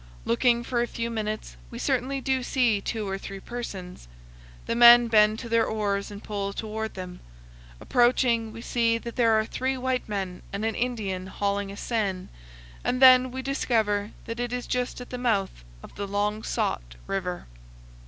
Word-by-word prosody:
Looking 235 - +2
for 240 0 -1
a 240 - 0
few 235 0 -4
minutes, 215 -1 -4
we 235 - -8
certainly 265 +1 -1
do 265 -1 0
see 245 -5 +1
two 215 0 -3
or 195 0 -3
three 195 0 -7
persons. 190 - -7 0.6
The - - -1
men 240 0 +8
bend 215 -1 +5
to 235 - -7
their 230 0 +2
oars 200 -2 -1
and 205 0 -9
pull 200 -1 -3
toward 220 +1 -4
them. 180 -1 -7 0.6
Approaching, 240 - +2
we 230 - -9
see 230 -2 +1
that 235 0 -8
there 230 -3 +4
are 215 - 0
three 260 +3 -2
white 255 -2 -2
men 190 -3 -3
and 200 +2 -3
an 225 - 0
Indian 205 -6 -2
hauling 200 0 -2
a 200 - -9
seine, 200 -6 -2 0.5
and 250 - 0
then 255 -1 +8
we 260 +1 -6
discover 220 -7 0 0.2
that 230 +1 -5
it 245 0 -2
is 250 0 -3
just 250 0 -2
at 250 - -10
the 250 - -4
mouth 200 - 0 0.2
of - - -12
the 200 0 -5
long 205 +2 -1
sought - - -2
river. 180 -2 -3
225 Hz, 180 wpm, -26 LUFS, 200-245 Hz, 0.6 s, men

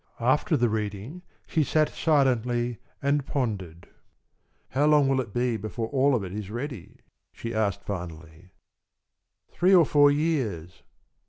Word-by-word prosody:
After 130 +6 +2
the 120 -2 +2
reading 105 - -4 0.2
she 160 - +1
sat 155 +1 +2
silently 125 -5 +1 0.2
and 140 +1 +1
pondered. 95 - -3 0.8
"How 145 +3 +1
long 150 -2 +5
will 135 -1 +2
it 115 - -8
be 120 +1 0
before 110 +2 -5
all 140 0 +3
of 110 - -1
it 95 -1 -7
is 105 -2 -5
ready?" 120 - -7 0.3
she 115 0 -6
asked 110 -3 -1
finally. 85 -2 -7 1.0
"Three 185 +2 +4
or 170 -3 +6
four 145 -1 +5
years." 130 - -1
120 Hz, 140 wpm, -26 LUFS, 105-145 Hz, 1.0 s, or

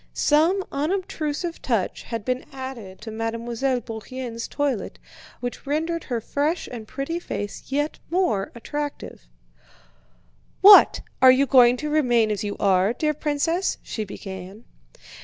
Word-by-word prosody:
Some 330 +6 +3
unobtrusive 330 0 -2
touch 225 -7 -1
had 230 -3 -6
been 255 0 -1
added 260 -8 -8
to 220 +1 -7
Mademoiselle 230 +3 -2
Bourienne's 230 +1 -6
toilet 280 -7 -2 0.4
which 245 +2 -6
rendered 325 +3 -1
her 240 -3 -2
fresh 295 +8 -1
and 225 -3 -7
pretty 290 +8 -3
face 205 - -5
yet 290 +3 -2
more 300 - 0
attractive. 290 - -6 1.3
"What! 405 +1 +9 0.2
Are 260 - +9
you 265 +2 +4
going 250 -2 +6
to 300 +3 -4
remain 240 -7 +3
as 210 - -2
you 205 -1 -4
are, 195 +2 +3
dear 305 +4 0
princess?" 305 +5 -1
she 220 - -4
began. 195 +1 -9
255 Hz, 130 wpm, -24 LUFS, 225-300 Hz, 1.3 s, What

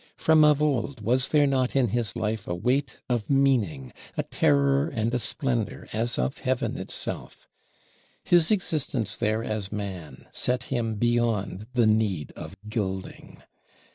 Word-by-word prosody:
From 160 -1 +5
of 150 -1 +5
old 135 -3 0
was 125 +5 +2
there 150 -1 +4
not 130 -2 +1
in 130 -4 +3
his 115 0 -1
life 110 -1 -2
a 85 - -2
weight 130 +9 -1
of 120 -4 -1
meaning, 115 - +1 0.2
a - - +1
terror 140 -2 +2
and 115 -4 -2
a 125 - +1
splendor 120 0 -2
as 115 +2 0
of 135 - -1
Heaven 130 -2 -1
itself? - - -5 0.8
His 170 -2 +4
existence 150 - 0
there 110 +1 0
as 105 -3 -3
man 95 -6 -6
set 125 0 0
him 115 -3 -1
beyond 110 -3 0
the 120 -2 +3
need 105 -8 +1
of 80 +5 -9
gilding. 95 -4 -5
120 Hz, 145 wpm, -26 LUFS, 105-135 Hz, 0.8 s, From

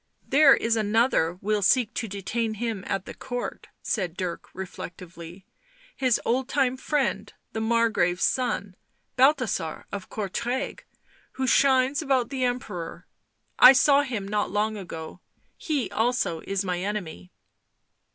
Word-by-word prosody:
" - - -39
There 285 -2 +8
is 230 0 0
another 215 -5 +2
will 210 +1 0
seek 230 +3 +3
to 225 - -3
detain 220 +3 -3
him 220 -3 -3
at 195 -1 -2
the - - -8
Court," 245 0 -6 0.2
said 180 -7 -2
Dirk 180 -3 -4
reflectively. 180 -1 -9 0.2
" - - -29
His 250 -3 +4
old 255 +2 0
time 260 -3 +1
friend, 280 +1 -1 0.2
the 220 - -2
Margrave's 220 -6 +1
son, 220 -7 0 0.4
Balthasar 250 - +1
of 200 -1 -6
Oourtrai, 235 +6 -3 0.5
who 265 - -2
shines 265 +2 +3
about 265 -5 +1
the 265 -2 -2
Emperor. 245 -9 -4 0.5
I 255 - +10
saw 280 +1 +5
him 235 -8 -4
not 210 0 -1
long 210 +2 0
ago 175 -4 -8 0.2
— - - -42
he 275 - -2
also 220 -6 0
is 195 0 -1
my 180 -1 -1
enemy." 180 - -5
220 Hz, 140 wpm, -26 LUFS, 190-255 Hz, 0.5 s, I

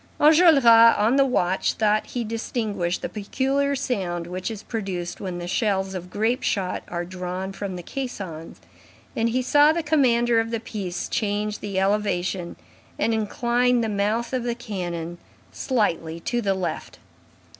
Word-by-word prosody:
Enjolras, 310 -2 +6
on 230 0 +7
the 275 0 +4
watch, 190 -7 +1
thought 215 0 +1
he 245 - -3
distinguished 215 -5 -2
the - - 0
peculiar 275 +6 -1
sound 190 -10 -2
which 180 +3 -4
is 220 -2 -7
produced 190 -6 -4
when 185 -3 -4
the 175 0 -5
shells 195 -1 0
of 180 -1 -6
grape 225 +7 0
shot 190 -3 -1
are 175 0 -4
drawn 185 +1 -5
from 195 -1 -5
the 175 - -7
caissons, 190 -11 -6 0.6
and 230 +1 +1
he 255 +2 0
saw 290 +4 +5
the 335 +1 -1
commander 240 -6 +3
of 225 0 -1
the 230 -1 -2
piece 200 -5 -5
change 210 0 -1
the 200 -2 -3
elevation 190 -3 0 0.4
and 225 - +1
incline 240 +3 +1
the 225 - -1
mouth 215 +4 -1
of 255 - 0
the 240 0 -2
cannon 175 -6 -5 0.3
slightly 170 - -1
to 240 +8 -2
the 195 -3 +1
left. 175 -4 -4
210 Hz, 155 wpm, -24 LUFS, 185-240 Hz, 0.6 s, on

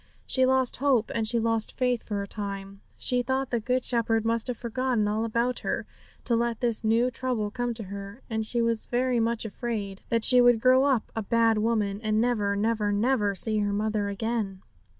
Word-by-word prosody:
She 260 -1 +2
lost 260 -1 +3
hope 260 -5 +1
and 225 -1 -1
she 235 - +1
lost 225 -1 0
faith 250 -2 +1
for 205 -2 -4
a - - -8
time. 200 -1 -6 0.2
She 250 -1 +2
thought 265 +1 -2
the 240 - +1
Good 250 +3 -1
Shepherd 225 -2 +1
must 230 +1 +1
have 250 -2 -2
forgotten 240 -2 -1
all 215 +2 -1
about 235 +2 0
her, - - -3 0.4
to 235 - +1
let 235 -1 -1
this 235 -3 0
new 230 +3 +2
trouble 235 -4 -2
come 245 0 -3
to 220 - -5
her. 200 +4 -9
And 220 -2 -2
she 235 +2 0
was 230 -1 -1
very 250 0 +1
much 230 0 -1
afraid 210 -3 -4
that 230 -1 +1
she 250 -1 +7
would 245 -2 +5
grow 255 +3 +4
up 265 -6 0
a 225 - -1
bad 225 +1 +2
woman, 210 -2 0
and 215 -1 0
never, 215 -4 +1
never, 210 0 0
never 210 -1 +1
see 215 +3 0
her 205 -1 0
mother 210 0 -1
again. 200 -2 -3
230 Hz, 205 wpm, -27 LUFS, 210-245 Hz, 0.4 s, she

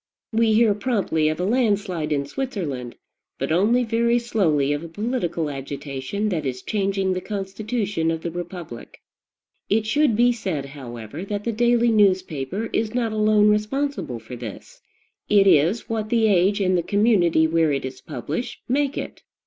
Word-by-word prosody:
We 225 0 +3
hear 220 -1 +4
promptly 200 -8 0
of 155 - -3
a - - 0
landslide 205 -8 0
in 140 -1 0
Switzerland, 145 - -4 0.4
but - - -3
only 215 +9 +3
very 235 +1 +2
slowly 165 - +1
of 145 +2 -3
a - - -6
political 190 -5 -2
agitation 140 +7 -4
that 165 -6 -1
is 130 -2 -4
changing 195 -2 0
the 185 - -3
constitution 200 -2 -2
of 165 -1 -2
the 170 - -3
republic. 175 -7 -8 0.7
It 215 +2 +2
should 285 +1 +2
be 240 +2 +4
said, 190 - -3
however, 130 - -8
that 205 0 -4
the 235 - -1
daily 240 +1 +3
newspaper 190 -3 +1
is 220 +1 -1
not 235 -3 0
alone 215 -1 +4
responsible 210 - -1
for 115 +2 -9
this: 115 -4 -9 0.5
it 200 -2 +5
is 185 +4 +3
what 220 -2 -2
the 230 -2 +3
age 200 0 +3
and 185 -1 +2
the 175 - +2
community 185 -5 +3
where 160 -1 +2
it 135 -2 -1
is 130 0 -7
published 150 - -5
make 280 +2 0
it. - - -6
195 Hz, 165 wpm, -23 LUFS, 155-225 Hz, 0.7 s, it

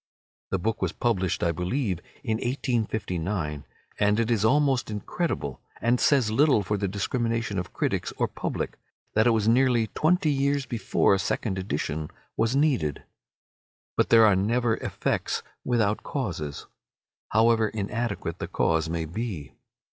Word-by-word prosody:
The 95 - 0
book 110 +4 -2
was - - 0
published, 95 -7 0
I 85 - +3
believe, 90 - -1 0.2
in 110 -4 0
1859, 105 - -2 0.3
and 105 +1 +3
it 115 0 +1
is 110 -3 +2
almost 135 +1 +3
incredible, 105 - -3 0.2
and 120 +1 +2
says 130 -7 +3
little 135 -2 +4
for 105 +3 -1
the 100 -1 -1
discrimination 115 +1 -1
of 90 - -5
critics - - -1
or - - +1
public, - - -4 0.3
that 110 +2 +4
it - - +6
was 110 -2 +2
nearly 120 -1 +4
twenty 165 0 +2
years 140 0 +1
before 115 -4 +2
a 95 - +2
second 95 0 -1
edition 80 -5 -3 0.3
was 115 +3 +1
needed. 130 - +1 0.9
But - - +2
there 115 -1 +7
are 105 -3 +5
never 115 +4 +1
effects - - -2 0.2
without 110 -4 +1
causes, 80 - -4 0.6
however 115 0 +4
inadequate 110 +1 -3
the - - -3
cause 80 0 +1
may 80 -1 -2
be. 85 - -5
110 Hz, 145 wpm, -26 LUFS, 95-120 Hz, 0.9 s, there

